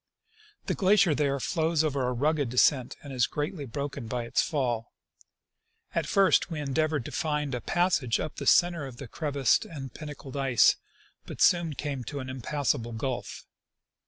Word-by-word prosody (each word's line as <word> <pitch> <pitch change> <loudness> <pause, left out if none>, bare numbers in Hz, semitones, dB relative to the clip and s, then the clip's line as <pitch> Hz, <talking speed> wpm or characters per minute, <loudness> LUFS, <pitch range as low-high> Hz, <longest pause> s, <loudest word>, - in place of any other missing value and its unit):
The - - 0
glacier 195 -3 +4
there 140 -1 0
flows 160 +2 +1
over 140 -4 0
a - - 0
rugged 145 +2 0
descent, 125 +1 +2
and 140 -2 -8
is 125 -2 +2
greatly 150 0 -4
broken 140 -1 -5
by 120 +1 -2
its 115 - +1
fall. 125 -7 -2 1.0
At - - -1
first 195 -1 +3
we 160 -3 -4
endeavored 150 -1 0
to - - -6
find 150 -4 -1
a 125 - -2
passage 170 -9 +1
up 155 - -5
the - - -4
center 170 -5 +4
of 125 -3 -11
the 135 - -8
crevassed 140 -3 +1
and 135 -6 -8
pinnacled 150 -3 -9
ice, 135 -4 +4 0.5
but - - -8
soon 170 -3 +4
came 140 -3 -4
to 145 +3 -5
an 130 -1 -5
impassable 130 -2 -2
gulf. 125 +2 -4
140 Hz, 165 wpm, -28 LUFS, 130-155 Hz, 1.0 s, glacier